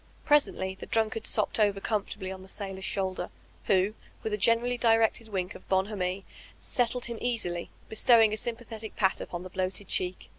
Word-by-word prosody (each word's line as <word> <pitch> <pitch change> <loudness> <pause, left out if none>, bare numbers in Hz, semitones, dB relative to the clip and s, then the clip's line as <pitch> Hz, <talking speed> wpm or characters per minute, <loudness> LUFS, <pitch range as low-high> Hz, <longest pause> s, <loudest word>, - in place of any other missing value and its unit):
Presently 280 -10 +3
the 190 - -10
drunkard 225 0 +1
sopped - - +2
over 205 -2 +3
comfortably 200 -2 -2
00 190 0 -6
the 190 - -12
sailor's 195 -1 -5
shoulder, 190 -3 -2 0.4
who, 195 +1 +3 0.3
with 220 - -2
a - - +1
generally 230 +4 +3
directed 225 -1 +3
wink 185 -3 -2
of - - -14
bonhomie, 190 -1 0 0.3
settled 245 0 -1
him 235 -1 -5
easily, 180 -8 -2 0.2
bestowing 220 -1 +5
a - - -1
sympathetic 225 -2 -5
pat 190 -2 +2
upon 175 0 -5
the 185 - -8
bloated 185 +1 -2
cheek. 180 0 -2
210 Hz, 170 wpm, -29 LUFS, 190-225 Hz, 0.4 s, bestowing